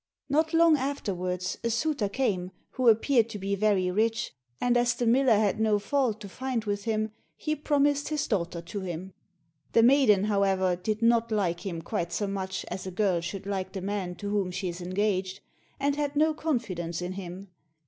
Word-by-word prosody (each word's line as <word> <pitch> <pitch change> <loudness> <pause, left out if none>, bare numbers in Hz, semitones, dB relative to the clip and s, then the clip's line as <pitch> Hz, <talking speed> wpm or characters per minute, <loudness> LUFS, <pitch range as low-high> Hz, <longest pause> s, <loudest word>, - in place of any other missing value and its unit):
Not 315 +3 +2
long 330 -2 +5
afterwards, 185 -10 -2
a 235 - +1
suitor 235 -2 0
came, 195 -7 -1 0.2
who 255 -3 +3
appeared 230 +1 +3
to 220 - -5
be 195 0 -2
very 195 -3 +2
rich, 225 +4 0 0.3
and 245 0 +2
as 245 0 +3
the 240 - -1
miller 245 0 +4
had 210 0 +1
no 215 -1 +3
fault 225 +1 0
to 205 - -7
find 250 +2 -3
with 205 0 -2
him, 215 -1 0 0.2
he 305 0 -2
promised 290 -1 +1
his 305 -2 -1
daughter 170 -5 -2
to 185 +4 -5
him. 185 0 -6 0.6
The 230 - +6
maiden, 240 -6 +5
however, 195 -3 +2
did 215 +5 -3
not 230 0 +3
like 185 -3 0
him 165 -3 -4
quite 175 -2 -2
so 205 - -1
much 190 -1 -3
as 190 0 -5
a - - -4
girl 185 -2 +1
should 190 +3 -5
like 190 -2 -3
the 190 - -4
man 190 -2 -3
to 205 +2 -5
whom 200 -3 0
she 180 +1 -3
is 175 +1 -6
engaged, 190 +1 -1 0.4
and 280 +1 +1
had 290 -1 -2
no 310 +2 +3
confidence 190 - -2
in 180 - -3
him. 185 +1 -7
205 Hz, 190 wpm, -28 LUFS, 185-245 Hz, 0.6 s, The